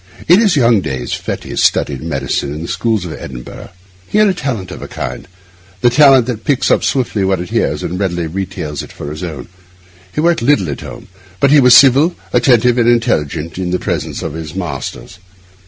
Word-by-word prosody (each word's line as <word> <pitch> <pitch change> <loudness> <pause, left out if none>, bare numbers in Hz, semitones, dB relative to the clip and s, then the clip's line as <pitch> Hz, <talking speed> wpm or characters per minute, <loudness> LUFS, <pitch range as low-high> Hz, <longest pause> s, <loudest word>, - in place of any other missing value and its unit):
In 175 +4 +6
his 205 -7 +3
young 115 -6 +3
days 65 -6 -4
Fettes - - -4
studied 70 -3 +1
medicine 70 -2 -2
in 80 - -6
the - - -6
schools 100 +1 -1
of 85 - -6
Edinburgh. 60 -2 -9 0.4
He - - -1
had 210 -3 +4
talent 115 - -4
of - - -8
a - - -7
kind, - - -6 0.5
the 120 - +4
talent 135 -2 +6
that 115 -3 -5
picks 140 -2 +1
up - - +2
swiftly 120 -6 0
what 95 -1 +1
it 90 0 -7
hears - - -1
and 90 +2 -4
readily 90 -4 -1
retails 90 -4 -5
it - - -11
for 75 - -7
its 75 - -7
own. 80 -8 -6 0.6
He - - -5
worked 170 +2 +2
little 115 - +2
at 70 - -6
home; - - -10 0.3
but 140 - +3
he 150 - +7
was 125 -2 +8
civil, 140 +6 +5 0.2
attentive, 125 0 +3
and 120 0 +3
intelligent 85 -8 0
in 90 -1 -2
the 90 - 0
presence - - -4
of - - -4
his 80 0 -7
masters. 90 0 -6
95 Hz, 200 wpm, -15 LUFS, 85-130 Hz, 0.6 s, was